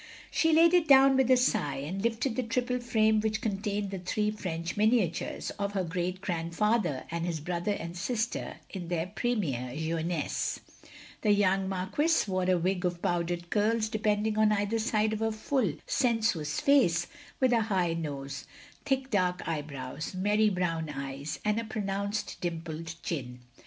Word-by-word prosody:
She 325 - +3
laid 330 +2 +6
it 350 -3 +4
down 270 -1 +7
with 265 -1 +3
a 255 - +7
sigh, 215 - +1
and 155 +8 -4
lifted 230 +2 0
the 255 - +1
triple 250 +1 -1
frame 220 -3 +3
which 220 0 0
contained 205 -2 -2
the 195 - -4
three 210 +4 0
French 170 -5 -4
miniatures, 210 -5 +1
of 200 0 -1
her 195 -2 0
great 180 +2 -3
grandfather 175 - 0
and 170 0 -2
his 170 -2 -2
brother 175 +5 -1
and 170 -3 -6
sister 215 +5 -2 0.2
in 180 -4 -6
their 170 -1 -1
premibre 145 - -1
jeunesse. 160 0 -1 0.6
The 215 - +1
young 195 -1 +2
Marquis 195 - +1
wore 185 -1 0
a 185 - +4
wig 180 +2 0
of 175 -1 -1
powdered 175 0 -1
curls 215 +1 +2
depending 215 0 0
on 215 0 +5
either 210 +2 +1
side 215 -1 +1
of 215 - -3
a 225 0 +1
full, 220 - 0
sensuous 220 - +1
face, 175 -13 +4 0.3
with 255 -2 +3
a 230 - +4
high 190 -6 +1
nose, 140 -4 -5 0.4
thick 270 -1 -1
dark 180 -3 +1
eyebrows, 145 0 -4
merry 210 +3 +3
brown 165 -4 -1
eyes, 140 +2 -5
and 210 +1 +2
a - - -2
pronounced 200 -1 -3
dimpled 165 -1 -4
chin. 125 -6 -4
195 Hz, 160 wpm, -29 LUFS, 170-220 Hz, 0.6 s, down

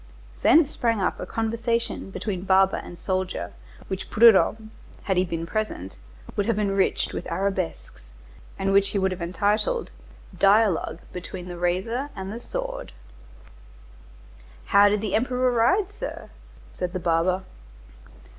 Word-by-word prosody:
Thence 310 -2 +5
sprang 230 -3 0
up 190 - -1
a - - -5
conversation 230 -1 -2
between 195 -1 -4
barber 190 0 +3
and 175 - -8
soldier 185 - -3 0.3
which 190 0 -5
Prudhomme, 220 0 +5 0.3
had 190 - 0
he 180 - +3
been 165 -2 -3
present, 170 - -4 0.4
would 205 0 0
have 230 - +1
enriched 195 -2 +1
with - - -5
arabesques, 80 - -3 0.5
and 195 0 0
which 200 0 +4
he - - -2
would 190 -1 +1
have 185 - -5
entitled: 205 - 0 0.4
"Dialogue 195 -4 +3
between 180 0 -6
the 175 -1 -7
razor 195 +10 -1
and 190 +1 -5
the 235 - -7
sword." - - -5 1.7
"How 205 0 +6
did 205 0 0
the 210 -3 -3
Emperor 250 +2 +1
ride, 305 - +2
sir?" 465 +4 -7 0.4
said 180 0 -4
the 185 - -2
barber. 175 +2 +1
195 Hz, 135 wpm, -25 LUFS, 185-225 Hz, 1.7 s, How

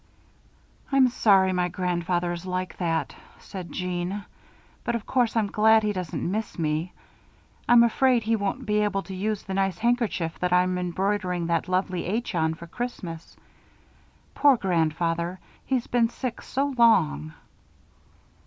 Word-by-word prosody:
'" - - -32
"I'm 270 -2 +5
sorry 195 -5 +4
my 180 -1 +1
grandfather 175 0 -1
is 170 0 -6
like 185 0 -3
that," 165 -2 -1 0.2
said 185 -3 -9
Jeanne, 180 +2 -3 0.6
"but 235 - -1
of 230 - -4
course 245 -3 +1
I'm 225 -2 +2
glad 220 +2 +4
he 210 0 0
doesn't 180 -1 -3
miss 215 +2 -3
me. 160 +2 -1 0.8
I'm 240 -1 +8
afraid 245 0 +3
he 225 +1 +1
won't 215 +5 -3
be 210 -1 +1
able 205 -2 0
to 190 - -8
use 205 +2 -2
the 195 - -6
nice 195 -2 0
handkerchief 230 -8 0
that 180 0 0
I'm 180 0 +2
embroidering 180 0 -1
that 165 0 0
lovely 185 -1 -1
'H' 220 +4 -2
on 160 -2 +1
for 170 - -10
Christmas. 175 -5 -6 1.0
Poor 285 -3 +5
grandfather. 170 -1 0 0.3
He's 255 -3 0
been 235 -2 +2
sick 245 0 -5
so 275 +2 -2
long." 80 - +3
190 Hz, 150 wpm, -25 LUFS, 175-225 Hz, 1.0 s, I'm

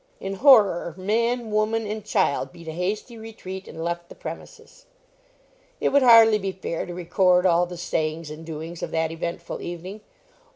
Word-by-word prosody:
In 195 - -4
horror, 205 - +5
man, 230 +4 0
woman, 215 +1 0
and 210 0 -5
child 190 -10 0
beat 170 -1 -14
a - - -3
hasty 205 +7 -4
retreat, 195 -4 -8
and 160 - -7
left 170 0 -4
the - - -12
premises. - - -10 0.9
It - - +1
would 280 - +4
hardly 225 -3 +7
be 195 -1 -3
fair 185 -3 -5
to 175 - -6
record 180 +1 +2
all 175 0 +3
the 175 0 -8
sayings 160 -2 -2
and 155 +1 -9
doings 165 +1 -7
of - - -3
that 160 0 -1
eventful 170 +1 -5
evening. 180 +5 -7
185 Hz, 170 wpm, -24 LUFS, 170-215 Hz, 0.9 s, hardly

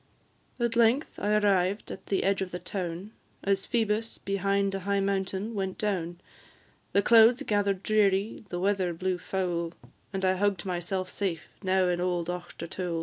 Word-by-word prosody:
At 235 -1 0
length 235 +5 +2
I 210 +1 +1
arrived 200 -1 +2
at 190 - -9
the 195 - +1
edge 195 0 +1
of 190 - -2
the 180 - -4
town, 180 +1 -5 0.3
As 195 0 +1
Phoebus, 225 -2 0
behind 195 0 0
a 195 - -2
high 200 +1 0
mountain, 195 +2 -1
went 190 -3 -3
down; 175 -5 -2 0.7
The 200 - +3
clouds 235 +4 +6
gather'd 200 -4 0
dreary, 205 -1 +2
and 175 0 -3
weather 190 -3 +1
blew 185 +1 -1
foul, 175 -3 -2 0.4
And 195 -1 -1
I 185 0 +2
hugg'd 200 -2 0
myself 185 +1 -2
safe 180 -6 -3
now 190 -1 +2
in 175 0 0
old 175 -1 -1
Auchtertool. 175 -1 -4
195 Hz, 160 wpm, -28 LUFS, 180-205 Hz, 0.7 s, clouds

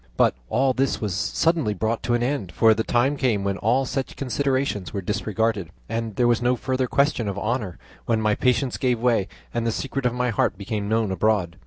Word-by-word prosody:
But - - +4 0.2
all 135 0 +2
this 135 +1 0
was 105 -4 -2
suddenly 110 - +1
brought 110 +4 -1
to 120 - +4
an 120 - 0
end, 120 -9 -2
for 110 -1 +5
the 110 +1 -1
time 125 +6 +2
came 115 -7 +1
when 100 0 -1
all 125 +5 +2
such 135 0 -3
considerations 130 - -1
were 100 - -3
disregarded, 105 -1 -1 0.2
and 115 -2 -3
there 120 - +3
was 120 0 +2
no 125 +1 +2
further 130 +1 -1
question 140 -4 +1
of 100 -1 -3
honour, 105 -3 -2 0.3
when 115 -1 +2
my 105 -1 +2
patience 125 +2 +1
gave 125 -3 +1
way 115 -5 +2 0.3
and 120 - -1
the - - +2
secret 135 +2 -2
of 120 - -2
my 125 -1 0
heart 105 - 0
became 105 0 -3
known 110 -2 +1
abroad. 95 -2 +1
115 Hz, 210 wpm, -24 LUFS, 105-130 Hz, 0.3 s, for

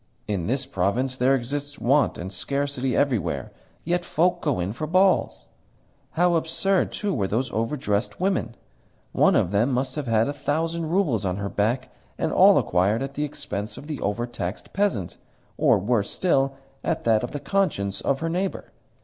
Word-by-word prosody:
In 100 -6 -2
this 130 +3 0
province 125 +4 0
there 130 +2 +3
exist 145 +3 -4
want 135 +2 +2
and 95 +3 -6
scarcity 140 +4 -1
everywhere: 115 - 0 0.3
yet 175 +2 0
folk 175 +1 +1
go 145 - 0
in 90 +3 -2
for 155 +6 -4
balls! 185 +3 +2 0.7
How 175 +1 +3
absurd, 170 +4 +1
too, 205 -2 -2
were 100 -8 0
those 120 +5 -1
overdressed 115 -2 -1
women! 185 - 0 0.6
One - - +4
of 90 - +2
them 110 +6 +2
must 130 +1 0
have 150 -4 -4
had 115 0 +3
a 145 - -2
thousand 160 +3 -2
roubles 160 - +1
on 95 -1 -1
her 100 0 -3
back, 125 +6 -1 0.3
and - - -1
all - - +7
acquired 100 +7 +2
at 135 0 -5
the 150 +1 -1
expense 105 -7 -5
of - - -9
the 150 -2 -5
overtaxed 105 -2 -3
peasant, 195 - 0 0.4
or, - - +4
worse 105 +1 0
still, 135 -6 +1 0.3
at - - -1
that 110 -2 +3
of 120 - -2
the 145 - -5
conscience 100 - 0
of 140 +1 0
her 165 - -1
neighbour. 185 +3 -3
130 Hz, 175 wpm, -24 LUFS, 105-155 Hz, 0.7 s, all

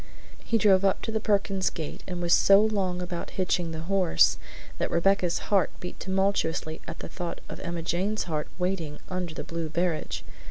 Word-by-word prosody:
He 230 - +1
drove 200 -3 +5
up 195 -1 +2
to 225 - -2
the 220 - 0
Perkins 195 -3 +1
gate 160 -2 -6
and 180 -2 -4
was 170 - +4
so 195 0 +7
long 195 -4 +1
about 175 -1 -5
hitching 180 -2 +1
the 160 0 -5
horse 185 0 +3 0.4
that - - 0
Rebecca's 180 0 +2 0.2
heart 195 -4 +4
beat 180 - -7
tumultuously 190 -5 0
at - - -6
the - - -7
thought 175 -2 -5
of - - -8
Emma 170 -1 -4
Jane's 190 +6 0
heart 155 -3 -2
waiting 180 -5 -2
under 180 -3 -3
the - - -4
blue 165 -1 -4
barege. 170 0 -1
180 Hz, 185 wpm, -27 LUFS, 170-195 Hz, 0.4 s, so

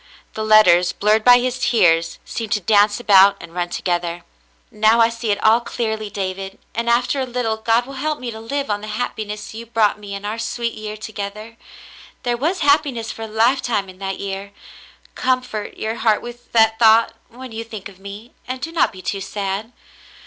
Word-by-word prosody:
The 220 - -4
letters, 180 -5 +5
blurred 215 +2 +2
by 245 +1 +8
his 250 0 -2
tears, 170 -7 +2
seemed 225 -2 -3
to 210 - +1
dance 205 +2 +3
about 200 -3 +6
and 170 0 -11
run 175 0 -2
together. 175 -1 -2 0.5
"Now 215 +2 +3
I 230 0 +5
see 230 -1 -5
it 205 - 0
all 220 +2 +5
clearly, 220 -3 -3
David, 195 0 -5 0.2
and, 235 +1 -2
after 245 +3 +2
a 260 - 0
little, 240 -3 -2
God 230 +2 +1
will 275 - -10
help 305 0 -1
me 245 -2 -5
to 220 - -8
live 275 +2 -3
on 205 0 -1
the 215 - -7
happiness 215 -1 -4
you 230 +1 -8
brought 220 -2 +1
me 200 -1 -7
in 200 +1 -7
our 215 +2 -3
sweet 230 0 -3
year 215 0 -7
together. 215 +1 -7 0.7
There 245 -1 0
was 320 +10 -1
happiness 280 -6 +2
for - - -10
a 225 - -4
lifetime 225 -2 +1
in 185 0 -14
that 195 -1 -4
year. 200 0 -5 0.6
Comfort 255 -5 -2
your 220 +1 -2
heart 220 -2 +2
with 240 0 -10
that 225 -1 +4
thought 225 0 +5 0.2
when 250 +1 -10
you 225 +1 -5
think 220 -4 -8
of 195 -2 -16
me, 200 +4 -10
and 255 +1 -4
do 330 - -5
not 330 - +2
be 185 -2 -12
too 195 +1 -3
sad. 200 +3 -4
220 Hz, 200 wpm, -20 LUFS, 200-235 Hz, 0.7 s, by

